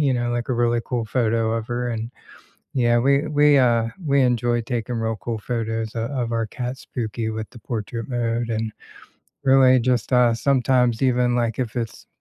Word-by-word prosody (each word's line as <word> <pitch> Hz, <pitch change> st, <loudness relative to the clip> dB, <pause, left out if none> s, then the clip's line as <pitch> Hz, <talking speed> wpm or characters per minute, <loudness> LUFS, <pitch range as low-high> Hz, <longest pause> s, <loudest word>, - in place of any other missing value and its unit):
you 135 Hz, -3 st, +2 dB
know, 120 Hz, 0 st, -1 dB
like, 120 Hz, +1 st, -2 dB
a -, -, +1 dB
really 120 Hz, -1 st, +1 dB
cool 120 Hz, -3 st, -2 dB
photo 115 Hz, -1 st, 0 dB
of 115 Hz, -1 st, -3 dB
her, 120 Hz, +1 st, -2 dB
and, 115 Hz, +1 st, -4 dB, 0.6 s
yeah, 120 Hz, -1 st, +3 dB
we 140 Hz, +3 st, +2 dB
we, 145 Hz, -1 st, +4 dB
uh 120 Hz, -3 st, +3 dB, 0.2 s
we 140 Hz, -1 st, +3 dB
enjoy 120 Hz, -1 st, +1 dB
taking 120 Hz, 0 st, -3 dB
real 115 Hz, 0 st, -1 dB
cool 115 Hz, -2 st, -3 dB
photos 115 Hz, -1 st, -3 dB
o 115 Hz, 0 st, -2 dB
of 125 Hz, -3 st, -3 dB
our 115 Hz, 0 st, 0 dB
cat, 125 Hz, +3 st, -5 dB
Spooky, 110 Hz, -2 st, -4 dB
with 110 Hz, 0 st, -5 dB
the 120 Hz, -, -13 dB
portrait 115 Hz, +1 st, -5 dB
mode, 120 Hz, -2 st, -1 dB
and, 110 Hz, -1 st, -2 dB, 0.7 s
really 130 Hz, -1 st, +6 dB
just, 125 Hz, 0 st, 0 dB
uh 125 Hz, -2 st, +4 dB
sometimes 125 Hz, -1 st, +2 dB
even, 125 Hz, -1 st, +2 dB
like, 120 Hz, -1 st, -1 dB
if 120 Hz, -4 st, -3 dB
it's 115 Hz, -2 st, -5 dB
120 Hz, 185 wpm, -22 LUFS, 115-125 Hz, 0.7 s, really